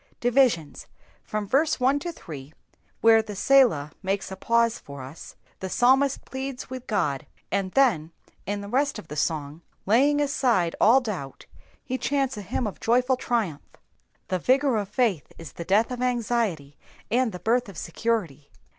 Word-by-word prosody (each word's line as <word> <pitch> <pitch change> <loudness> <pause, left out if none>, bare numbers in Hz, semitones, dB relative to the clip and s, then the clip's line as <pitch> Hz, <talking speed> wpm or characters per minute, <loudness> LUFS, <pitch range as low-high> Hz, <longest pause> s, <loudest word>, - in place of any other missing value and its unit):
Divisions.— 240 - +1 0.4
l^hwi 210 -1 -2
verse 285 +7 +2
1 265 +3 +3
to 345 +3 -4
3, 150 - -10 0.5
where 225 0 +6
the 215 -1 -8
tielah 205 - +4
makes 195 0 -2
a - - -4
pause 230 +3 +1
for 140 -2 -10
us, 135 +5 -11 0.2
the 190 - -5
psalmist 265 +5 +3
pleads 265 -1 -6
with 255 -1 -7
God, 155 -9 -1 0.2
and 195 -1 -1
then 190 - +3 0.4
in 205 0 -2
the 200 - -7
rest 275 +6 0
of 160 - -10
the 150 - -6
song, 150 0 -2 0.2
laying 275 +8 +4
aside 245 - +1
all 245 +5 +6
doubt, 185 - -6 0.4
hk 255 0 -3
chants 275 -2 0
a 210 - -6
hymn 220 +5 -3
of 210 - -5
joyful 250 +3 +2
trivrnph. 225 - -1 0.7
The 185 - 0
vigour 265 - +2
of 205 -2 -3
faith 210 - 0
is 165 -5 -9
the 170 - -7
death 210 +7 +2
of 250 0 -4
anxiety, 230 - -1 0.3
and 245 0 +2
the 180 - -6
birth 230 +5 0
of 190 - -11
security. 170 - -2
220 Hz, 165 wpm, -25 LUFS, 170-255 Hz, 0.7 s, where